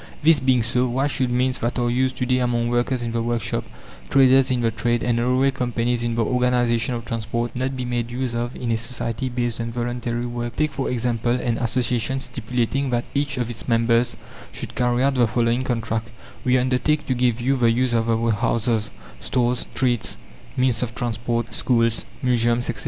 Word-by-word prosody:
This 160 Hz, 0 st, +6 dB
being 130 Hz, -2 st, +3 dB
so, 125 Hz, +2 st, +1 dB
why 130 Hz, +3 st, 0 dB
should 135 Hz, -3 st, 0 dB
means 125 Hz, +1 st, +1 dB
that 120 Hz, +2 st, -1 dB
are 120 Hz, -1 st, +1 dB
used 130 Hz, +2 st, +1 dB
to 125 Hz, -, 0 dB
day 125 Hz, 0 st, +2 dB
among 120 Hz, -1 st, 0 dB
workers 120 Hz, +1 st, 0 dB
in 115 Hz, -, -2 dB
the 115 Hz, 0 st, -1 dB
workshop, 115 Hz, -2 st, -1 dB, 0.5 s
traders 135 Hz, 0 st, +5 dB
in 125 Hz, -2 st, +1 dB
the 115 Hz, -1 st, +1 dB
trade, 120 Hz, +1 st, 0 dB
and 120 Hz, -1 st, +1 dB
railway 130 Hz, +3 st, +2 dB
companies 120 Hz, -1 st, -1 dB
in 120 Hz, -1 st, -1 dB
the 115 Hz, -1 st, +1 dB
organization 125 Hz, -1 st, +1 dB
of 115 Hz, -1 st, -6 dB
transport, 115 Hz, 0 st, -3 dB
not 130 Hz, +1 st, -1 dB
be 125 Hz, -, -3 dB
made 120 Hz, -1 st, -2 dB
use 125 Hz, 0 st, -2 dB
of 120 Hz, +1 st, -3 dB
in 120 Hz, -2 st, -3 dB
a 115 Hz, -, +2 dB
society 115 Hz, +1 st, -3 dB
based 120 Hz, -1 st, -2 dB
on 115 Hz, 0 st, -3 dB
voluntary 120 Hz, 0 st, -2 dB
work? 120 Hz, -1 st, -4 dB
Take, 155 Hz, 0 st, +1 dB
for 135 Hz, -1 st, -2 dB
example, 120 Hz, -1 st, 0 dB
an 120 Hz, -2 st, -1 dB
association 125 Hz, +1 st, 0 dB
stipulating 125 Hz, +2 st, -2 dB
that 120 Hz, -1 st, 0 dB
each 140 Hz, 0 st, -1 dB
of 120 Hz, -2 st, -1 dB
its 115 Hz, -2 st, -7 dB
members 115 Hz, 0 st, +2 dB, 0.3 s
should -, -, -6 dB
carry 125 Hz, 0 st, +1 dB
out 140 Hz, 0 st, +3 dB
the 125 Hz, -3 st, +3 dB
following 120 Hz, +2 st, +1 dB
contract: 115 Hz, -3 st, -2 dB, 0.3 s
"We 130 Hz, 0 st, +3 dB
undertake 130 Hz, +4 st, +1 dB
to 130 Hz, -, 0 dB
give 120 Hz, -2 st, +1 dB
you 130 Hz, +3 st, +1 dB
the 120 Hz, -3 st, +3 dB
use 120 Hz, +1 st, +1 dB
of 115 Hz, 0 st, +1 dB
our 115 Hz, 0 st, +2 dB
houses, 110 Hz, 0 st, 0 dB, 0.3 s
stores, 125 Hz, -1 st, 0 dB
streets, 120 Hz, -3 st, -1 dB, 0.4 s
means 125 Hz, -3 st, +2 dB
of 120 Hz, -2 st, -3 dB
transport, 115 Hz, -2 st, -2 dB
schools, 115 Hz, -2 st, +1 dB, 0.2 s
museums, 120 Hz, -1 st, +2 dB
etc. -, -, -9 dB
120 Hz, 195 wpm, -23 LUFS, 115-125 Hz, 0.5 s, This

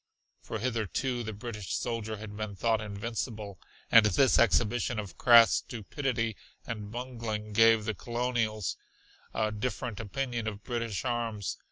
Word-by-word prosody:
For 115 Hz, -, -5 dB
hitherto 120 Hz, +2 st, -1 dB
the 110 Hz, -2 st, -4 dB
British 105 Hz, -2 st, -5 dB
soldier 110 Hz, -2 st, -3 dB
had 105 Hz, 0 st, -8 dB
been 105 Hz, -1 st, -4 dB
thought 110 Hz, +2 st, +1 dB
invincible, 105 Hz, -1 st, -4 dB, 0.3 s
and 115 Hz, -, +9 dB
this 105 Hz, +6 st, +4 dB
exhibition 120 Hz, +1 st, +2 dB
of 100 Hz, -5 st, -5 dB
crass 115 Hz, -2 st, +8 dB
stupidity 115 Hz, -1 st, -2 dB, 0.3 s
and 105 Hz, -3 st, -5 dB
bungling 115 Hz, -3 st, -4 dB
gave 115 Hz, 0 st, +5 dB
the 110 Hz, -, 0 dB
colonials 120 Hz, -2 st, -1 dB, 0.5 s
a 110 Hz, -1 st, 0 dB
different 105 Hz, 0 st, -3 dB
opinion 120 Hz, +1 st, -3 dB
of 105 Hz, -1 st, -5 dB
British 115 Hz, -3 st, -3 dB
arms. 115 Hz, -5 st, -2 dB
115 Hz, 135 wpm, -30 LUFS, 105-120 Hz, 0.5 s, and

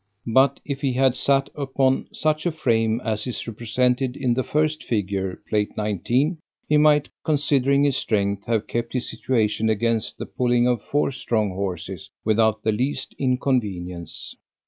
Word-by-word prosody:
But 130 Hz, +4 st, +3 dB
if 140 Hz, -2 st, -4 dB
he 135 Hz, -3 st, +1 dB
had 130 Hz, 0 st, +3 dB
sat 135 Hz, +1 st, +1 dB
upon 135 Hz, -2 st, 0 dB
such 155 Hz, +2 st, 0 dB
a -, -, +1 dB
frame 115 Hz, -6 st, +1 dB
as 110 Hz, 0 st, -2 dB
is 125 Hz, -, -4 dB
represented 125 Hz, +3 st, 0 dB
in 125 Hz, -3 st, +1 dB
the 130 Hz, -, +1 dB
first 155 Hz, +3 st, 0 dB
figure, 95 Hz, -4 st, -2 dB
(Plate 105 Hz, -1 st, -1 dB
19) 120 Hz, -, 0 dB, 0.3 s
he 150 Hz, -, +4 dB
might 150 Hz, -1 st, +4 dB
(considering 140 Hz, -2 st, +2 dB
his 140 Hz, -2 st, +2 dB
strength) 100 Hz, -2 st, 0 dB
have 115 Hz, -2 st, 0 dB
kept 120 Hz, 0 st, -3 dB
his 125 Hz, -2 st, -1 dB
situation 110 Hz, -3 st, 0 dB
against 115 Hz, +1 st, 0 dB
the -, -, -5 dB
pulling 120 Hz, -1 st, +1 dB
of 120 Hz, -4 st, +1 dB
four 145 Hz, -1 st, 0 dB
strong 110 Hz, -5 st, -1 dB
horses 95 Hz, 0 st, -5 dB, 0.2 s
without 110 Hz, 0 st, +2 dB
the 110 Hz, -, +2 dB
least 130 Hz, +5 st, -2 dB
inconvenience. 105 Hz, -, -2 dB
120 Hz, 155 wpm, -23 LUFS, 105-135 Hz, 0.3 s, he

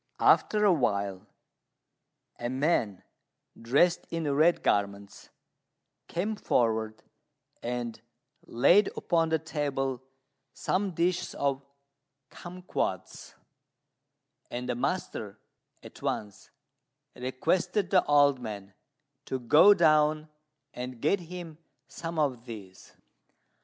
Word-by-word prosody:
After 210 Hz, -1 st, +4 dB
awhile 100 Hz, -, +1 dB, 1.1 s
a 120 Hz, -, -3 dB
man 130 Hz, -, 0 dB, 0.6 s
dressed 145 Hz, +10 st, +2 dB
in 160 Hz, -4 st, -2 dB
red 160 Hz, +4 st, +3 dB
garments 100 Hz, 0 st, -1 dB, 0.8 s
came 205 Hz, +6 st, -2 dB
forward 110 Hz, -, 0 dB, 0.6 s
and 120 Hz, -2 st, -4 dB, 0.5 s
laid 175 Hz, -, +4 dB
upon 165 Hz, -2 st, +1 dB
the 160 Hz, -, +2 dB
table 140 Hz, -4 st, -3 dB, 0.5 s
some 190 Hz, -1 st, -1 dB
dishes 175 Hz, +2 st, 0 dB
of 140 Hz, -1 st, -1 dB, 0.7 s
cumquats; 180 Hz, +1 st, -5 dB, 1.1 s
and 125 Hz, +1 st, -5 dB
the 125 Hz, -, 0 dB
master 120 Hz, -, -3 dB, 0.5 s
at -, -, -13 dB
once 105 Hz, -2 st, -4 dB, 0.7 s
requested 175 Hz, -, -1 dB
the 185 Hz, -, +5 dB
old 145 Hz, -2 st, +4 dB
man 105 Hz, -4 st, -7 dB, 0.5 s
to 130 Hz, -, -2 dB
go 155 Hz, -, +6 dB
down 155 Hz, -2 st, +3 dB, 0.4 s
and 125 Hz, -1 st, -6 dB
get 155 Hz, +10 st, +2 dB
him 170 Hz, -2 st, -9 dB, 0.3 s
some 165 Hz, 0 st, -6 dB
of 130 Hz, -6 st, 0 dB
these. 100 Hz, -6 st, -11 dB
140 Hz, 95 wpm, -28 LUFS, 120-170 Hz, 1.1 s, go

